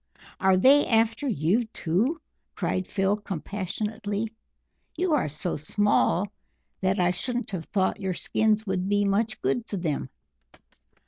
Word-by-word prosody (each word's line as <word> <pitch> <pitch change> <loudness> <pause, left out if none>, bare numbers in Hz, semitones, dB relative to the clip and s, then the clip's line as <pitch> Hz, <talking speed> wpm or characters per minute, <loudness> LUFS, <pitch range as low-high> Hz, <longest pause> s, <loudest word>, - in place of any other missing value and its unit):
"Are 190 -1 +4
they 275 +9 +6
after 225 +4 +2
you, 200 - +2
too?" 220 - -1 0.4
cried 185 0 -1
Phil 195 +1 +1
compassionately. 205 +3 -4 0.7
"You 355 -2 +1
are 290 - +2
so 155 +4 -3
small 200 +3 +2 0.5
that 190 +1 +1
I 180 0 +3
shouldn't 240 +5 -2
have 175 -5 -4
thought 190 +1 0
your 190 -3 -2
skins 220 +3 +1
would 190 -1 -1
be 205 0 +2
much 215 +3 +1
good 235 -2 0
to 200 - -3
them!" 155 -6 -2
205 Hz, 135 wpm, -26 LUFS, 185-225 Hz, 0.7 s, they